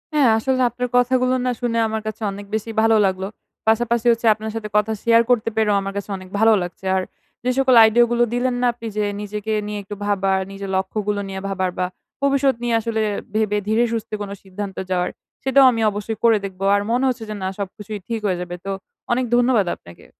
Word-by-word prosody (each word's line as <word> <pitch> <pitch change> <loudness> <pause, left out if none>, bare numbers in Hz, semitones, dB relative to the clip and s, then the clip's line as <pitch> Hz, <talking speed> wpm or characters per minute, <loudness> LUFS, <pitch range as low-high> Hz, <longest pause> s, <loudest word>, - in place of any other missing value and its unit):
হ্যাঁ, 280 -5 +5
আসলে 260 +3 0
আপনার 250 +2 -3
কথাগুলো 255 +1 +3
না 250 - +2
শুনে 235 -1 0
আমার 220 0 -3
কাছে 215 - -5
অনেক 200 +1 -8
বেশি 220 +1 -3
ভালো 225 0 +4
লাগলো। 190 0 -1 0.4
পাশাপাশি 235 +1 +2
হচ্ছে 230 0 0
আপনার 220 +1 -6
সাথে 215 -2 -4
কথা 210 +1 +1
share 230 0 +5
করতে 230 -2 +3
পেরেও 210 -2 +3
আমার 195 0 -5
কাছে 200 - -5
অনেক 185 0 -12
ভালো 225 +1 +6
লাগছে। 175 +2 -7
আর, 190 - +2 0.4
যে 250 - 0
সকল 260 -2 +4
আইডিয়াগুলো 240 +2 +4
দিলেন 245 +1 0
না - - +2
আপনি 230 -1 -8
যে 210 - +2 0.2
নিজেকে 210 +1 -4 0.2
নিয়ে 210 0 -4
একটু 205 +1 -7
ভাবার, 195 -1 +1
নিজের 195 0 -6
লক্ষ্যগুলো 205 +2 -1
নিয়ে 190 0 -5
ভাবার 190 -1 -1
বা 180 - +2 0.4
ভবিষ্যৎ 275 -1 +2
নিয়ে 240 -1 +1
আসলে 225 0 -2 0.3
ভেবে 210 -1 +1
ধীরে 220 +3 +3
সুস্থে 225 -1 -3
কোনো 200 -1 -5
সিদ্ধান্ত 195 0 -6
যাওয়ার, 180 0 +1 0.3
সেটাও 265 +1 +5
আমি 225 -1 -2
অবশ্যই 210 +2 -4
করে 225 -2 +5
দেখব। 190 -1 -8
আর 200 - +2
মনে 250 +3 +2
হচ্ছে 245 -3 -3
যে 215 - -4
না, 185 - 0
সবকিছুই 205 +1 -6
ঠিক 230 -1 -2
হয়ে 185 -2 0
যাবে 175 0 -5
তো, 195 - -2 0.4
অনেক 255 +1 +2
ধন্যবাদ 245 -4 +3
আপনাকে। 85 0 -16
220 Hz, 205 wpm, -21 LUFS, 200-240 Hz, 0.4 s, ভালো